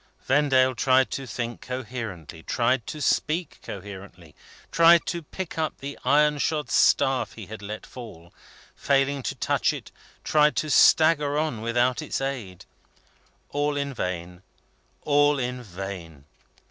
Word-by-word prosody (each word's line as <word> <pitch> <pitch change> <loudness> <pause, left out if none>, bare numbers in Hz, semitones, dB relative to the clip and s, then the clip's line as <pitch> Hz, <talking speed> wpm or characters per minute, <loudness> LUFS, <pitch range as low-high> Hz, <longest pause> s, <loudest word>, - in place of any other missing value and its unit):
Vendale 130 -2 +3
tried 130 +1 +3
to 135 -1 -4
think 120 -1 -5
coherently, 115 - -6
tried 120 +6 0
to 155 - -6
speak 155 +2 0
coherently, 95 -5 -10 0.4
tried 170 +1 +6
to 170 - -3
pick 170 +2 -7
up 155 -1 -2
the 140 +1 -7
iron 150 +2 +3
shod 150 -3 -1
staff 135 -1 +3
he 110 - -9
had 105 +2 -9
let 105 +1 -7
fall; 95 -9 -11 0.4
failing 140 0 +1
to - - -4
touch - - +1
it, - - -8 0.3
tried 150 -1 +3
to 155 - -1
stagger 150 -3 +5
on 150 -8 -1
without 120 +2 +1
its - - -3
aid. 125 -10 -5 0.9
All 145 0 0
in 140 -1 -2
vain, 90 -4 -5 0.6
all 145 0 +3
in 125 -1 -3
vain! 90 - -8
130 Hz, 135 wpm, -25 LUFS, 105-145 Hz, 0.9 s, tried